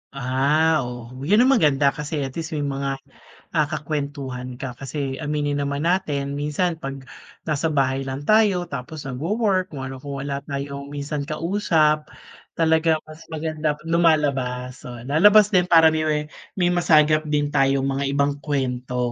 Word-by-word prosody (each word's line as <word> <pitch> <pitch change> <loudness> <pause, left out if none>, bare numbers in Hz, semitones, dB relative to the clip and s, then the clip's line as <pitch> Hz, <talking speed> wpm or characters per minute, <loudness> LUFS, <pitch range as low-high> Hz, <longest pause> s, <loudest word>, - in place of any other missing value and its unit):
Ah, 140 +5 +2
oh, 120 -1 -8
yun 200 - +4
ang 260 - +4
maganda 145 - +4
kasi 150 -1 -4
at 135 - -4
least 160 +1 -5
may 145 - -1
mga, 140 -1 -2 0.6
ah, 150 -3 +2
kakuwentuhan 140 -5 -4
ka. 130 0 -5
Kasi 135 0 -4
aminin 145 -1 -1
naman 140 +1 -2
natin 150 -6 0
minsan 160 +3 -1
pag 135 -2 -6 0.4
nasa 155 0 -1
bahay 135 -2 0
lang 135 +2 -4
tayo 210 -2 +3
tapos 140 +3 -6
nagwo-work 185 - 0
kung 140 -4 -7
ano, 130 0 -6
kung 140 +1 -6
wala 140 -1 -3
tayong 140 0 -5
minsan 145 0 -4
kausap, 155 -3 +1 0.5
talagang 160 -1 +2
mas 155 +1 -14
maganda 155 -1 -2
pag 155 - -14
lumalabas. 135 -7 +1
So, 125 - -7
lalabas 205 - +5
din 180 -3 +3
para 165 -2 +6
may 155 0 0
me 150 0 -1 0.2
may 175 -2 +2
masagap 155 -3 +3
din 145 -1 0
tayong 135 -1 +2
mga 135 0 -1
ibang 140 +1 0
kuwento. 125 -4 -2
145 Hz, 155 wpm, -23 LUFS, 135-160 Hz, 0.6 s, para